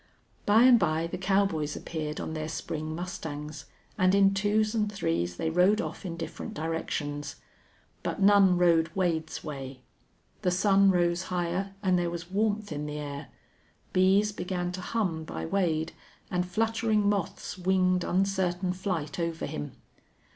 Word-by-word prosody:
By 215 +3 +6
and 250 -2 +7
by 160 -2 +1
the 170 - -5
cowboys 190 -6 +1
appeared 155 -2 -4
on - - -4
their 155 0 -3
spring 155 0 -4
mustangs, 155 -4 -6 0.3
and 185 +1 +4
in 195 0 +5
twos 210 +2 +1
and 210 -2 0
threes 85 - -1
they 160 - -1
rode 185 +5 +4
off 195 - -4
in 170 -1 -5
different 165 - -6
directions. 150 -2 -3 0.7
But - - -3
none 195 -2 +6
rode 165 -2 +4
Wade's 165 -4 -1
way. 135 -4 -7 0.6
The - - +2
sun 195 +2 +4
rose 175 -1 +2
higher, 180 +2 -2
and 185 -2 +3
there 175 -1 0
was 170 +1 -6
warmth 210 -1 0
in 150 0 -3
the 150 0 -4
air. 145 -1 -6 0.7
Bees 195 +3 +4
began 180 -2 -3
to 185 +1 -6
hum 180 -6 -1
by - - -5
Wade, 165 -3 0 0.4
and 180 -1 0
fluttering 225 0 +1
moths 200 -1 -2
winged 185 -1 +2
uncertain 185 -1 0
flight 180 -5 -3
over 165 -1 -2
him. 75 0 -5
180 Hz, 150 wpm, -28 LUFS, 160-195 Hz, 0.7 s, and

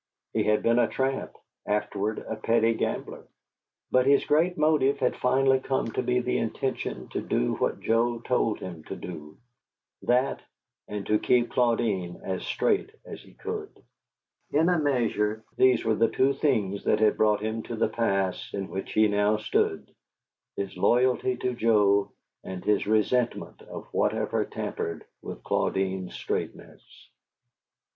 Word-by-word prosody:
He - - +1
had 105 0 +2
been 115 +1 +3
a 120 - +4
tramp, 135 0 -2 0.3
afterward 105 0 -1
a 110 - -3
petty 115 +1 +2
gambler; - - -4 0.6
but 130 +1 +3
his 140 0 +4
great 165 +4 +2
motive 150 -3 +3
had 130 -3 0
finally 135 +1 +3
come 130 -3 -1
to - - -1
be 125 0 +1
the 125 - 0
intention 115 - -3
to - - -3
do - - 0
what - - -1
Joe 120 +1 +1
told 115 -2 0
him 85 -4 -8
to - - -6
do: 75 -4 -9 0.6
that, 125 +2 +1 0.5
and 105 -1 -5
to 105 0 +2
keep 120 -1 +2
Claudine 115 -7 0
as 95 -1 -3
straight - - 0 0.2
as - - -9
he - - -18
could. - - -5 0.8
In 160 +4 +3
a 175 -2 +2
measure, 115 -6 0
these 130 -2 +4
were 110 - +3
the 115 +1 +2
two 135 +1 +2
things 105 -9 0
that - - +3
had 110 -1 +4
brought 105 -1 +2
him 110 +1 -2
to 120 - -6
the 110 - +1
pass 100 -5 -1
in 95 -1 -4
which 95 - -5
he 110 0 +5
now 105 +1 +2
stood, 105 - -1 0.6
his 100 -1 -4
loyalty 125 +5 +2
to 125 0 -1
Joe 105 -4 +3 0.3
and 95 -1 -7
his 105 -1 +2
resentment 115 +3 0
of - - -9
whatever - - 0
tampered 85 -1 -5 0.2
with - - -8
Claudine's 95 -1 -1
straightness. - - -5
115 Hz, 150 wpm, -27 LUFS, 100-125 Hz, 0.8 s, he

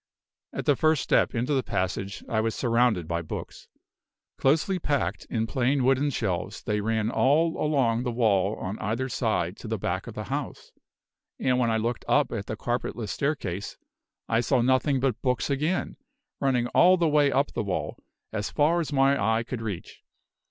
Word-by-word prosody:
At - - -5
the 145 - +4
first 155 +1 +2
step - - +2
into 125 +5 0
the 135 - +2
passage, 95 -2 -3
I 110 -1 +1
was 115 0 -1
surrounded 115 - +2
by 85 0 -1
books. 80 - -7 0.7
Closely 160 +7 +2
packed 145 -4 -1
in 110 -2 0
plain 130 +3 +1
wooden 135 +3 +3
shelves, 100 -10 -3
they 105 0 -1
ran 110 +1 0
all 160 +7 +3
along 130 -7 +2
the 125 -1 -2
wall 105 -4 +2
on 95 +3 -5
either 115 +5 -2
side - - -1
to - - -9
the - - -2
back - - -3
of - - -8
the - - -4
house; - - -5 0.7
and 130 -1 +2
when 120 -2 +2
I 110 - +2
looked 115 +2 -2
up 145 - +3
at 105 -4 -4
the 110 - -4
carpetless 120 -2 -3
staircase, 100 - -3 0.5
I 115 - +2
saw 125 0 +2
nothing 130 +2 +2
but 130 -4 -1
books 125 +2 0
again, 155 +7 -1 0.4
running 125 -3 +1
all 185 +1 +5
the 170 -2 +2
way 145 -2 +3
up 140 +2 +1
the 120 - -1
wall, 95 -3 -3 0.3
as 105 -1 -2
far 160 +3 +2
as 160 -3 -3
my 135 -4 +3
eye 110 +2 +2
could 120 0 -5
reach. 105 -6 -6
125 Hz, 180 wpm, -26 LUFS, 110-140 Hz, 0.7 s, all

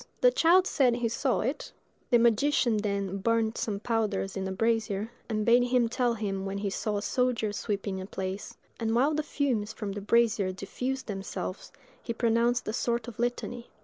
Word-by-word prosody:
The - - +6
child 370 -5 +5
said 255 -9 +3
he 240 -1 0
saw 255 +2 0
it; 260 +7 -3 0.4
the 245 - +6
magician 235 0 +3
then 200 -2 -1
burnt 225 +2 +1
some 205 -3 -2
powders 210 -4 -1
in 190 -1 -2
a - - -3
brazier, 220 0 0 0.2
and 215 -1 -1
bade 240 +1 +5
him 245 -1 +2
tell 240 -1 +1
him 195 -3 -3
when 195 0 -3
he 200 -1 -2
saw 210 +1 -1
a 205 - -3
soldier 240 -5 0
sweeping 200 -2 -3
a 185 - -7
place; 190 0 -5 0.2
and 225 -1 0
while 275 +6 +3
the 305 - +1
fumes 245 -8 -1
from 210 -2 -5
the 205 +1 -5
brazier 215 -2 +2
diffused 255 +8 -4
themselves, 195 -2 -5 0.3
he 235 - -3
pronounced 235 +1 +1
a 215 - -1
sort 235 -1 -1
of 235 -2 -9
litany. 240 0 -2
225 Hz, 185 wpm, -29 LUFS, 205-245 Hz, 0.4 s, The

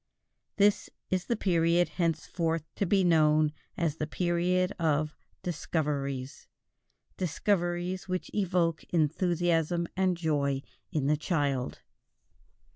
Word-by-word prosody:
This 205 0 +3 0.2
is 185 0 0
the 235 - 0
period 175 -3 +2
henceforth 165 -1 -1
to 200 - -1
be 195 +1 +3
known 155 -3 +4 0.2
as 160 -3 0
the 155 - -2
period 180 +2 +1
of 155 -2 +1 0.3
"discoveries," 140 -5 -2 0.7
discoveries 180 0 -1
which 185 -1 -3
evoke 175 -5 +1
enthusiasm 170 +1 +1
and 185 -1 +2
joy 140 -4 0 0.3
in 150 -3 0
the 150 +2 +3
child. 145 -6 -1
170 Hz, 105 wpm, -29 LUFS, 150-180 Hz, 0.7 s, known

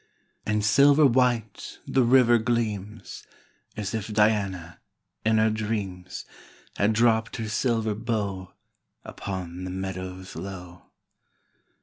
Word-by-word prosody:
5 - - 0
And 105 0 0
silver 140 +6 +6
white 120 -4 +1
the 135 - +2
river 120 -1 +5
gleams, 110 -3 -3 0.5
As 105 -2 -3
if 110 -2 -3
Diana, 100 -5 +1 0.4
in 110 0 +3
her 110 0 +3
dreams, 105 -4 -4 0.5
• - - -15
Had 105 +2 +3
dropt 115 0 +2
her 110 -2 -4
silver 110 0 0
bow 100 -4 -3 0.5
Upon 90 -2 -6
the 95 - -4
meadows 95 0 -6
low. 90 0 -8
105 Hz, 115 wpm, -26 LUFS, 95-115 Hz, 0.5 s, silver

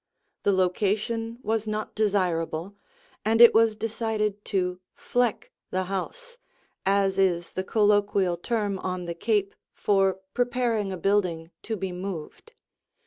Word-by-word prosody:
The 200 - +2
location 210 +5 0
was 220 0 -1
not 215 0 -3
desirable, 185 -3 0 0.5
and 225 +2 +2
it 235 0 +10
was 225 -1 +4
decided 215 -2 -2
to 180 -2 -1 0.2
"fleck" 245 -3 -1 0.2
the 185 0 -1
house, 480 - -5 0.5
as 195 -1 +2
is 175 -3 +1
the 185 - -2
colloquial 205 -3 +2
term 205 +1 -2
on 185 -1 -3
the 170 - -3
Cape 200 +2 0 0.2
for 195 -2 +2
preparing 240 -4 0
a 185 - -4
building 180 -3 0
to 220 -1 -4
be 190 -1 -3
moved. 185 - -7
200 Hz, 130 wpm, -26 LUFS, 185-220 Hz, 0.5 s, it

